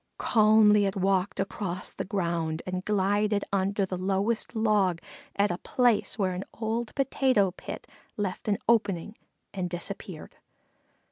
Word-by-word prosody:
Calmly 215 -2 +5
it 195 - -3
walked 190 0 +1
across 190 -2 -3
the - - -4
ground 170 -4 -2
and 185 0 -3
glided 205 +1 +1
under 195 +1 +1
the 185 -1 -5
lowest 200 +5 0
log 210 -6 +2 0.4
at 200 -1 +2
a 175 - -3
place 245 -5 +1
where 190 -3 0
an 180 +1 -4
old 225 +1 -3
potato 260 -7 +2
pit - - -8 0.3
left 200 -1 -3
an 205 -2 +2
opening 210 -3 +1 0.4
and 185 -2 -2
disappeared. 175 -1 -7
200 Hz, 135 wpm, -28 LUFS, 185-215 Hz, 0.4 s, Calmly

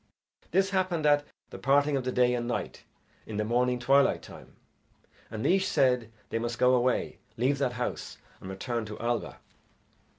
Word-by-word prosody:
This 195 +2 +2
happened 185 -5 0
at 145 0 +4 0.3
the - - -8
parting 145 +1 +3
of 135 - -1
the 130 - -2
day 125 0 +3
and 120 -1 -2
night 120 - -4 0.4
in 110 - -5
the 105 - +1
morning 125 +2 +1
twilight 135 +3 +3
time, - - -13 0.7
and 110 0 -5
Naois 190 +2 +3
said 125 - +1 0.2
they 115 - 0
must 120 0 -3
go 125 +2 +4
away, 125 0 +1 0.2
leave 135 +4 +1
that 130 -3 0
house, 125 +1 -4 0.2
and 95 - -9
return 115 +5 -3
to 105 0 -8
Alba. 120 +1 -2
125 Hz, 170 wpm, -28 LUFS, 120-140 Hz, 0.7 s, at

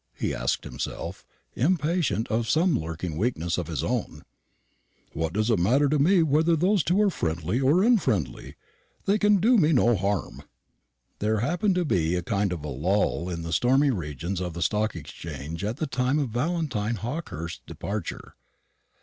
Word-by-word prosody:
he - - -2
asked - - -1
himself, - - -6 0.3
impatient 150 - +1
of 115 0 0
some 165 0 +3
lurking 80 0 -5
weakness 90 -5 -1
of 85 - -4
his 80 -5 -3
own; - - -3 0.9
"what 80 0 -2
does 110 +5 0
it 110 - +2
matter 130 +11 +3
to 150 +1 +1
me 175 +4 +4
whether 160 +3 +3
those 180 +2 +2
two 180 +4 +2
are 210 -2 +4
friendly 85 - -1
or 145 +8 +4
unfriendly? 125 - +1 0.5
They 205 +2 +2
can 210 0 +4
do 225 +5 +4
me 160 -2 +4
no 120 -3 +4
harm." 100 -1 -2 0.8
There 105 0 0
happened 180 - +1
to 180 -1 +1
be 85 - +1
a 90 - -2
kind 100 -5 0
of 80 -4 -4
lull 85 +4 0
in 85 -2 -4
the 85 0 -4
stormy 135 - +3
regions 85 - -4
of 90 -2 -4
the 85 - -1
Stock 105 +4 0
Exchange 80 +1 -7
at 110 +3 -2
the - - -1
time 130 +1 0
of 140 -5 0
Valentine 125 -4 -1
Hawkehurst's 110 - -5
departure. - - -5
115 Hz, 165 wpm, -26 LUFS, -, 0.9 s, me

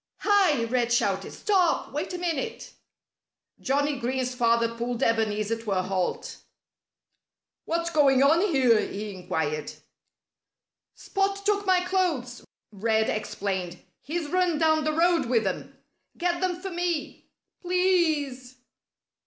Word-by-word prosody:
"Hi!" 380 - +3
Red 240 0 0
shouted. 240 - 0
"Stop! 370 -5 +1
Wait 300 +5 -3
a 360 - -4
minute!" 355 +7 -4 0.9
Johnnie 285 +2 0
Green's 255 +1 -2
father 235 -1 +2
pulled 240 +2 -3
Ebenezer 220 0 0
to 220 -3 -5
a 185 -1 0
halt. 185 -1 -3 1.3
"What's 335 +1 -1
going 275 -4 +4
on 315 +5 +4
here?" 255 - +4
he 205 0 -4
inquired. 160 -5 -3 1.2
"Spot 395 0 -2
took 410 -1 +1
my 370 -1 +4
clothes," 325 -11 -1 0.3
Red 220 +1 +1
explained. 190 -4 -3 0.2
"He's 315 +3 -4
run 360 -3 +2
down 315 -1 +2
the 310 - +1
road 335 -2 +2
with 230 -2 +2
them. - - -4 0.4
Get 345 0 -1
them 360 -1 -1
for 385 +1 -6
me 345 -4 -3 0.3
please!" 315 -9 0
280 Hz, 120 wpm, -26 LUFS, 230-350 Hz, 1.3 s, going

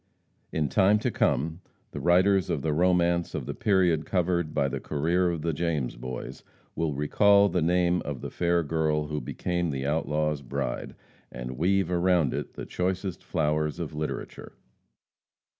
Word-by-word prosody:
In 75 -2 0
time 100 +5 +4
to 105 - -1
come, 80 +7 0 0.3
the - - -6
writers 95 +2 +3
of 70 - -1
the 80 - 0
romance 85 0 +2
of - - -3
the - - -4
period 90 -6 +2
covered 85 -3 0
by 70 - +1
the 70 0 -3
career 85 +6 0
of 85 -3 -3
the 85 -1 0
James 80 -6 -1
Boys, 60 +1 -7 0.3
will 80 -3 -1
recall 100 +8 +4
the 90 - 0
name 90 +1 +2
of 70 -3 -5
the - - -6
fair 85 -1 +1
girl 75 -1 0
who 75 -1 -2
became 85 +7 -2
the 70 -2 -3
outlaw's 75 0 0
bride, - - -4 0.4
and 60 +1 -6
weave 95 +1 +2
around 90 -4 +2
it - - -5
the - - -6
choicest 95 0 -3
flowers 75 -3 -1
of 80 -2 -4
literature. 75 0 -5
85 Hz, 160 wpm, -27 LUFS, 75-90 Hz, 0.4 s, time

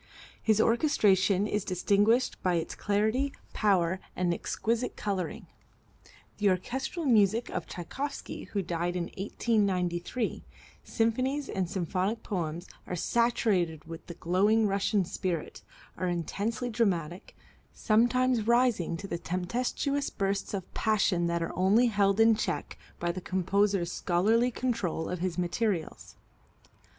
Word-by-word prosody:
His 220 -1 +2
orchestration 205 - +3
is 210 -1 -1
distinguished 205 +6 +2
by 180 -1 +1
its 165 - -2
clarity, 220 +7 0 0.2
power 185 -4 +2 0.2
and 175 -1 +1
exquisite 230 +7 -2
coloring. 190 -4 -3 0.9
The 205 -1 +4
orchestral 265 - -2
music 225 -2 +3
of - - -4
Tschaikowsky, 275 - -5
who 200 -2 -2
died 175 +1 -2
in 180 - -1
1893, 195 0 -1 0.4
symphonies 255 +5 0
and 185 -3 -2
symphonic 190 +4 -1
poems, 175 -3 -3 0.2
are 180 - -3
saturated 185 -6 +1
with 165 0 -9
the 170 - -7
glowing 200 +6 +2
Russian 200 0 +1
spirit, 170 -2 -4 0.3
are 185 - -2
intensely 205 +8 -2
dramatic, 180 -6 -1 0.4
sometimes 240 +1 +2
rising 235 -9 +2
to 195 -1 -4
tempestuous 245 - -1
bursts 195 +1 -2
of 190 -2 -7
passion 195 -5 +1
that 170 0 0
are - - -5
only 195 +7 +4
held 200 -1 +2
in 225 0 +7
check - - -3 0.2
by 175 0 0
the 185 +2 -6
composer's 190 0 +1
scholarly 215 +10 +2
control 230 -10 -2
of 180 - -3
his 180 -1 -2
materials. 180 -1 -2
200 Hz, 120 wpm, -29 LUFS, 180-230 Hz, 0.9 s, in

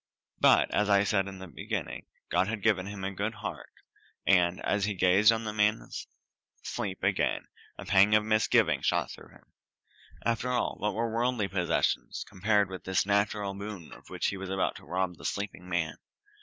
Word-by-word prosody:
But, - - +5
as 105 0 +2
I 100 -1 +5
said 100 -1 +1
at 95 -1 -8
the 95 0 -9
beginning, 85 - -5 0.2
God 90 +2 +2
had 105 -2 -4
given 100 -3 +2
him 100 -1 -7
a 95 - -2
good 100 +3 -3
heart, 105 - -7 0.5
and, 90 -2 +3
as 100 -1 +1
he 105 -1 -2
gazed 95 +4 +5
on 115 0 -1
the 105 -1 -4
man's 105 +1 0 0.6
sleep 100 -7 -4
again, 100 0 0 0.3
a - - -8
pang 100 +2 +5
of 105 - +4
misgiving 110 0 +3
shot - - 0
through - - -12
him. - - -21 0.7
After 115 +2 0
all, 125 -1 0
what 105 -1 -1
were 115 0 -1
worldly 120 -3 0
possessions 90 -3 0
compared 100 +1 +2
with 95 0 -8
this 95 0 +1
natural 100 0 0
boon 100 -4 -8
of - - -15
which - - -1
he 100 - -4
was 95 -1 -6
about 95 0 0
to - - -14
rob 90 -1 -2
the - - -14
sleeping 95 -3 -4
man? 85 -3 -1
100 Hz, 185 wpm, -29 LUFS, 95-105 Hz, 0.7 s, But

